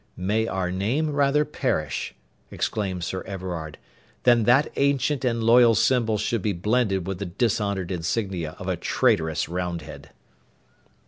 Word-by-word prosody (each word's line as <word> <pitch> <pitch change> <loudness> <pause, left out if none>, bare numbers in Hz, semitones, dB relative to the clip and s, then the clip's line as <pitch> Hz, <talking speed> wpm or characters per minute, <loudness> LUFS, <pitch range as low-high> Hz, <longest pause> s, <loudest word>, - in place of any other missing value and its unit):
'May 105 +5 0
our 95 -3 -2
name 120 +12 0
rather 145 +1 +2
perish,' 130 - -2 0.3
exclaimed 95 -5 -2
Sir 95 +2 -3
Everard, 90 -5 -5 0.5
'than 120 -3 +4
that 130 +6 +4
ancient 140 0 +1
and 115 -2 0
loyal 115 0 +6
symbol 110 -1 +2
should 110 +1 -1
be 105 +1 0
blended 100 0 0
with 95 -1 -4
the 100 - -3
dishonoured 100 -1 -1
insignia 90 -2 -2
of - - -8
a - - 0
traitorous 80 -1 +1
Roundhead!' 90 0 -5
105 Hz, 135 wpm, -24 LUFS, 90-120 Hz, 0.5 s, loyal